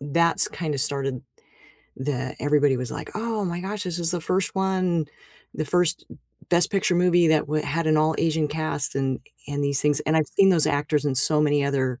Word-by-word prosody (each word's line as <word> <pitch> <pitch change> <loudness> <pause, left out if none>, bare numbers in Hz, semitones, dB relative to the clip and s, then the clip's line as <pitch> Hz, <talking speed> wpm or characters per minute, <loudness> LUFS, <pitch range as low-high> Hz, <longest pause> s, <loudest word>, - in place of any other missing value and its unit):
that's 165 +4 +2
kinda 155 -5 -4
started, 135 -1 -2 0.7
the 130 -1 -4
everybody 145 -2 +2
was 125 -2 -4
like, - - -7
"Oh 220 -1 -2
my 175 -1 -3
gosh, 200 +2 -4
this 180 -2 -3
is 170 -1 +1
the 175 - -2
1st 185 +4 -1
one, 185 -4 0 0.5
the 155 - -2
1st 175 +1 +1 0.4
Best 175 -1 +4
Picture 195 -2 +1
movie 175 -1 +3
that 155 -1 +2
w 150 +1 -1
had 165 +3 -2
an 155 0 +3
all 155 +1 +2
Asian 160 -1 +1
cast," 155 -2 -2
and 135 -1 -1 0.3
and 145 0 -3
these 140 -1 +1
things, 150 -1 +2
and 155 +1 0
I've 155 -2 +2
seen 195 -1 +3
those 170 -4 +4
actors 145 +1 0
in 140 - 0
so 150 +3 +4
many 145 -1 +2
other 130 -2 -1
155 Hz, 200 wpm, -24 LUFS, 145-175 Hz, 0.7 s, Best